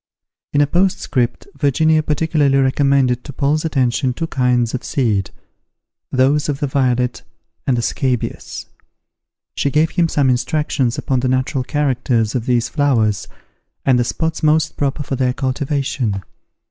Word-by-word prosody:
In 145 - +3
a - - +5
postscript, 145 -7 0
Virginia 155 +3 +2
particularly 150 -2 +1
recommended 135 -2 +2
to - - -8
Paul's 145 +3 0
attention 130 -4 0
two 165 - -3
kinds 125 -5 +1
of 130 - -3
seed, 110 - 0 0.8
those 140 +4 +2
of 140 -1 -2
the - - 0
violet 125 -4 0 0.5
and 130 -3 +2
the 120 - -1
scabious. 125 -2 -2 0.9
She 140 - 0
gave 155 +3 +2
him 170 -2 +1
some 140 -4 +2
instructions 130 -1 0
upon 130 -2 0
the 130 - 0
natural 130 +1 0
characters 125 -6 0
of 125 -1 -2
these 120 -2 +2
flowers, 120 - +1 0.6
and 130 -2 +4
the - - +3
spots 160 +7 -2
most 155 0 +2
proper 145 +1 -1
for 135 - -3
their 125 -1 +1
cultivation. 135 -6 -2
135 Hz, 145 wpm, -18 LUFS, 125-145 Hz, 0.9 s, a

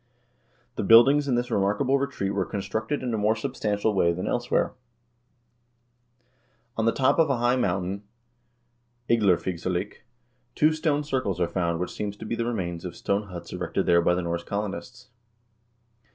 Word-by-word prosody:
The - - -1
buildings 135 +7 +6
in 130 - +2
this 120 +1 -1
remarkable 115 +8 +1
retreat 135 -8 -2
wyere 100 -2 -2
constructed 110 +7 -3
in 125 -2 -2
a 110 - 0
more 105 +2 +2
substantial 110 -4 -1
way 85 -3 +3
than 90 +2 -4
elsewhere. 120 0 0 2.0
On 110 - 0
the 115 - +4
top 130 +6 +2
of 160 -2 +4
a 135 - +1
high 120 +1 +2
mountain, 95 -4 -1 1.1
Igdlerfigsalik, 95 -3 0 0.6
two 155 +1 +4
stone 155 -2 0
circles 130 - -2
are 85 - +2
found 85 -2 -1
which 90 0 -3
seem 105 - -3
to 105 - -10
be 110 - -3
the 115 - -2
remains 85 -8 -3
of 90 - -6
stone 100 +1 -1
huts 85 -3 -8
erected - - -2
there 85 0 +4
by 90 +1 +2
the 90 - -2
Norse 85 0 -2
colonists. 105 +5 -5
105 Hz, 160 wpm, -26 LUFS, 90-125 Hz, 2.0 s, buildings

